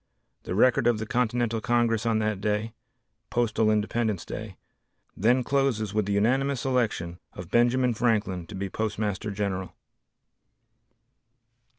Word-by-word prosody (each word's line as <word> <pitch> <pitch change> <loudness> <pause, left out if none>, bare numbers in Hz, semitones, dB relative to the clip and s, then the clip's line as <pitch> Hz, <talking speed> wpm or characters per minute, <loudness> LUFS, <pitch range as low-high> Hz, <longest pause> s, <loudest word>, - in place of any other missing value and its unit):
The 90 - -3
record 120 +2 +4
of 120 -2 +3
the 110 - -4
Continental 120 -1 0
Congress 115 0 +1
on 115 -1 +2
that 110 -2 -1
day 105 +2 -1 0.6
(postal 115 -2 +1
independence 110 -2 0
day), - - -7 0.6
then 120 +5 +3
closes 125 -7 0
with 105 -2 0
the 100 - 0
unanimous 130 +7 +1
election 110 -10 -1
of 90 -1 -9
Benjamin 120 +1 +3
Franklin 105 -7 0
to 105 - -8
be 100 +1 -3
Postmaster 105 0 -2
General. 100 -2 -3
110 Hz, 125 wpm, -27 LUFS, 105-120 Hz, 0.6 s, record